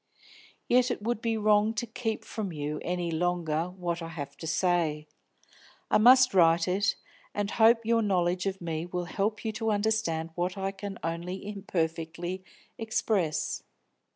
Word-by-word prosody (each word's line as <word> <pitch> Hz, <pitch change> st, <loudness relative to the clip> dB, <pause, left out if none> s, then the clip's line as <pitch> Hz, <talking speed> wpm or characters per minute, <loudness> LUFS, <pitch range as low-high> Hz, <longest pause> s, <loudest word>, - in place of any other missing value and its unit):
Yet 250 Hz, +1 st, +4 dB
it 240 Hz, -4 st, -3 dB
would 235 Hz, 0 st, -1 dB
be 230 Hz, -1 st, 0 dB
wrong 210 Hz, +1 st, +3 dB
to 225 Hz, -, -1 dB
keep 225 Hz, -1 st, -3 dB
from 210 Hz, -4 st, -4 dB
you 150 Hz, -1 st, -3 dB
any 175 Hz, -1 st, -2 dB
longer 165 Hz, -1 st, 0 dB
what 175 Hz, -2 st, -3 dB
I 165 Hz, -, -5 dB
have 145 Hz, -4 st, -7 dB
to 160 Hz, -, -7 dB
say. 160 Hz, -3 st, +1 dB, 0.9 s
I -, -, +5 dB
must 255 Hz, +2 st, +7 dB
write 170 Hz, -2 st, +5 dB
it, 195 Hz, +2 st, +1 dB, 0.4 s
and 205 Hz, 0 st, -1 dB
hope 225 Hz, 0 st, +5 dB
your 230 Hz, 0 st, +3 dB
knowledge 185 Hz, -2 st, +1 dB
of 190 Hz, -1 st, -3 dB
me 165 Hz, 0 st, -3 dB
will 175 Hz, 0 st, -3 dB
help 210 Hz, +6 st, -2 dB
you 220 Hz, -, 0 dB
to 225 Hz, +1 st, -2 dB
understand 205 Hz, -7 st, 0 dB
what 180 Hz, +3 st, -2 dB
I 195 Hz, 0 st, -1 dB
can 195 Hz, 0 st, -7 dB
only 170 Hz, +4 st, -4 dB
imperfectly 175 Hz, -2 st, -3 dB, 0.4 s
express. 215 Hz, -7 st, 0 dB
185 Hz, 155 wpm, -29 LUFS, 170-215 Hz, 0.9 s, must